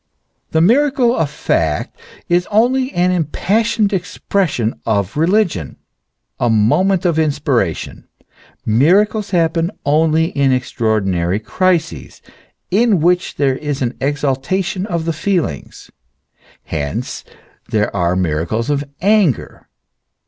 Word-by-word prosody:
The 160 - +1
miracle 250 - +3
of 160 -3 0
fact 80 - -1 0.3
is 175 +1 +1
only 255 +5 +2
an 180 +1 +2
impassioned 205 +6 0
ex 180 -2 -3
pression 150 - -1
of 100 -3 -1
religion, 165 - 0 0.6
a 120 - +1
moment 170 - +2
of 165 -2 +2
inspiration. 140 - -1 0.6
Miracles 195 - +2
happen 165 -2 +1 0.2
only 160 +2 +2
in 140 -4 +1
extraordinary 105 -7 0
crises, 170 - -1 0.5
in 210 -1 +3
which 180 +3 +1
there 135 -2 +1
is 145 -2 -3
an 125 0 -2
exaltation 145 +8 -1
of 170 -5 -2
the 165 - -1
feelings: 160 - -3 0.7
hence 70 -3 -4 0.5
there 105 -1 0
are 85 +1 +1
miracles 90 - -1
of 145 0 0 0.2
anger. 195 - +1
160 Hz, 110 wpm, -17 LUFS, 115-190 Hz, 0.7 s, miracle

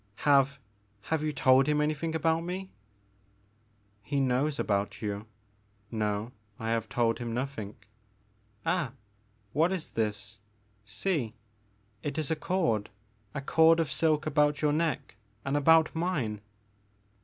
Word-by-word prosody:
Have 140 -1 +5 0.2
— 100 0 -32
^have 160 -1 +1
you 155 0 0
told 135 -1 +4
him 150 0 +2
anything 155 +2 0
about 160 0 +2
me?" 185 +2 -5 1.3
*'He 140 +7 -1
knows 135 +3 +1
about 100 -4 -1
you 105 +1 -3 0.3
— 105 +1 -26
^no, 105 +1 -1 0.3
I 115 -1 -2
have 115 -1 -1
told 115 -1 +1
him 120 -1 -3
nothing, 120 -6 -4 0.5
— 105 0 -37
ah, 165 -9 0 0.6
what 165 +4 +3
is 185 -4 -3
this 105 -1 -2 0.2
— 105 0 -38 0.2
see 145 - 0 0.3
— 105 +1 -38
^it 145 0 -3
is 155 -1 -1
a - - +3
cord, 155 - 0 0.5
a 140 - -2
cord 160 +3 +5
of 160 -5 0
silk 155 -2 +2
about 150 -1 +2
your 150 -1 +3
neck 155 -8 -1
— 105 +4 -37
and 135 +1 0
about 160 +2 +5
mine 145 - -1
135 Hz, 150 wpm, -29 LUFS, 105-155 Hz, 1.3 s, Have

